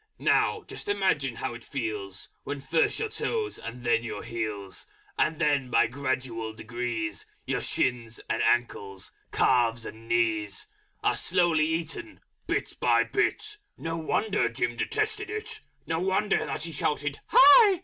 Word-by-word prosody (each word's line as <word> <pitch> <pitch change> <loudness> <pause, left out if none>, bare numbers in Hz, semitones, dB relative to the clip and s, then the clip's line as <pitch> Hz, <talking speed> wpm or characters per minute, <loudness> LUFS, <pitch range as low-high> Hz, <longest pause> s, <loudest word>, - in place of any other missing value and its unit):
Now - - +2
just - - -5
imagine 170 -11 +1
how 120 - -3
it 115 0 -9
feels 105 -8 -4
When 145 0 -4
first 145 +4 +1
your 445 - -1
toes 435 -1 -2
and 120 +2 -7
then 120 -1 +2
your 115 - -5
heels, 105 -4 -4 0.3
And 155 0 +1
then 145 -5 +1
by - - +4
gradual 130 -3 -2
degrees, 110 -2 -4 0.2
Your - - -1
shins 120 -2 -1
and - - 0
ankles, 100 -5 0 0.2
calves 120 -2 +3
and 115 +1 -9
knees, 110 -3 +1 0.4
Are - - +3
slowly 170 -4 +3
eaten, 165 - -3 0.3
bit - - -2
by - - +4
bit. 420 0 -1 0.2
No 165 0 -3
wonder 165 - +1
Jim 120 0 -1
detested 430 - -1
it! 435 +1 -5 0.3
No 160 -1 -1
wonder 190 +3 +1
that - - -3
he 165 - -3
shouted 150 -1 -1
"Hi!" 385 +1 +8
135 Hz, 145 wpm, -28 LUFS, 115-185 Hz, 0.4 s, Hi